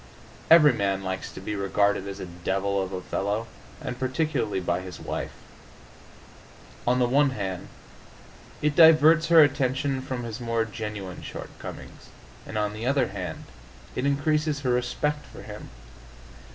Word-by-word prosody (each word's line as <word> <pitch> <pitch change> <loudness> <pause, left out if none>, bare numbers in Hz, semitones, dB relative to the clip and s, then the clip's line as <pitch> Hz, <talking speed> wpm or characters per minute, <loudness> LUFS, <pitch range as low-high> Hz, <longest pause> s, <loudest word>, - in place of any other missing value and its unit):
Every 155 -4 +8
man 100 -3 -1
likes 95 0 -4
to - - -9
be 95 +3 -4
regarded 100 0 +1
as 100 0 -6
a 95 - -5
devil 95 +3 -1
of 95 0 -4
a 90 -1 -5
fellow, 105 +3 -2 0.3
and 125 - -5
particularly 130 -6 0
by 90 0 -1
his 90 -1 -9
wife. - - -4 1.5
On 125 +1 +4
the 125 -1 +3
one 140 +3 +4
hand, 95 -7 -4 1.0
it 150 -1 +2
diverts 160 0 +7
her 165 -2 +8
attention 135 -1 0
from 130 -2 -4
his 115 0 -5
more 115 -1 0
genuine 105 -4 -6
shortcomings, - - -9 0.4
and 110 - -5
on 105 -1 0
the 110 +3 -4
other 135 -4 +2
hand 95 -2 -6 0.5
it 130 +2 0
increases 150 +1 +1
her 130 -3 0
respect 150 +5 -1
for - - -11
him. - - -9
120 Hz, 150 wpm, -26 LUFS, 100-140 Hz, 1.5 s, Every